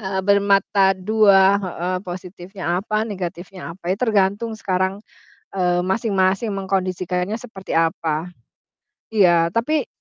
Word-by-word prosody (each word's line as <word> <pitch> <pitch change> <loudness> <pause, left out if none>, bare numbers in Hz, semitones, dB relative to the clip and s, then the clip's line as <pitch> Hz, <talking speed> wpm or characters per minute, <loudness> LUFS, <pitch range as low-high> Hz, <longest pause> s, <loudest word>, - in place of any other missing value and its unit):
eee, 190 -2 -2
bermata 200 -1 +3
dua, 200 -1 +4
heeh, 185 -1 -3
positifnya 180 0 -5
apa, 215 +2 -1
negatifnya 180 -2 -6
apa. 180 -1 -2
Ya - - -2
tergantung 215 -1 +1
sekarang, 190 0 -1 0.6
eee, 180 -1 +2
masing-masing 195 +1 +1
mengkondisikannya 185 0 -2
seperti 200 -6 -9
apa. 165 0 0 0.9
Iya, 175 -5 +4
tapi 275 +4 0
190 Hz, 110 wpm, -21 LUFS, 180-200 Hz, 0.9 s, dua